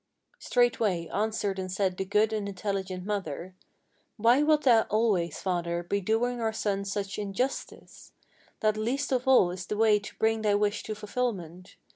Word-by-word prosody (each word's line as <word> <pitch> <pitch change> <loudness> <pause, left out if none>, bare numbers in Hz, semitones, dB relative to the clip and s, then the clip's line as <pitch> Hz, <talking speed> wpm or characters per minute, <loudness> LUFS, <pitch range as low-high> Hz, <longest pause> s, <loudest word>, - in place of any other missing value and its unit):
Straightway 220 -8 +1
answered 205 -2 -1
and 185 -1 -4
said 190 -1 0
the 190 - -3
good 210 +3 +2
and 205 -2 -2
intelligent 190 -2 -4
mother: 185 -4 -4 0.6
"Why 235 +5 +4
wilt 305 0 +3
thou 230 -4 +5
always, 210 -6 +1
father, 175 -2 -2
be 200 +3 -1
doing 235 +4 0
our 225 -1 +1
son 200 -2 -1
such 200 0 -3
injustice? 210 +6 -4 0.5
That 215 0 +2
least 255 +7 -1
of 255 0 0
all 250 -9 +5
is 180 -1 -7
the 210 - -3
way 215 -1 +4
to 205 - -11
bring 220 0 +1
thy 210 -1 +2
wish 205 +1 0
to 215 - -4
fulfilment. 200 -6 -4
210 Hz, 165 wpm, -28 LUFS, 190-225 Hz, 0.6 s, thou